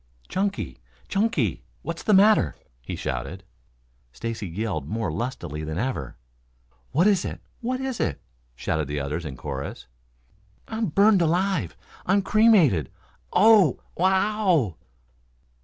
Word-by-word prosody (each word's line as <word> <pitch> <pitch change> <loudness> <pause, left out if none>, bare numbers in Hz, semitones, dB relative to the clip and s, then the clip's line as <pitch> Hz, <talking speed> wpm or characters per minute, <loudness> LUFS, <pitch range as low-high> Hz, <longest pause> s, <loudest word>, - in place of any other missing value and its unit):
"Chunky, 195 - -2 0.3
Chunky! 195 - 0 0.2
What's 170 +2 -4
the 210 - +3
matter?" 195 - +5 0.3
he - - -5
shouted. 70 +10 -4 0.7
Stacy 115 - -5
yelled 85 -5 -3
more 110 -4 -2
lustily 80 - -4
than 80 +1 -4
ever. 130 +5 -3 0.7
"What 165 +6 +3
is 200 -4 +4
it? - - -5 0.2
What 255 +2 -2
is 265 -2 -3
it?" 75 - -1 0.4
shouted 80 +3 -2
the 75 +1 -2
others 75 +4 -3
in 65 -4 -6
chorus. - - -6 0.8
"I'm 220 -1 -2
burned 200 +4 +4
alive? 180 +4 0 0.3
I'm 195 +2 +3
cremated! 185 - +4 0.4
Oh, 215 -2 +5 0.2
w 185 - +3
o 205 +2 +1 0.2
w!" - - -13
160 Hz, 125 wpm, -25 LUFS, -, 0.8 s, matter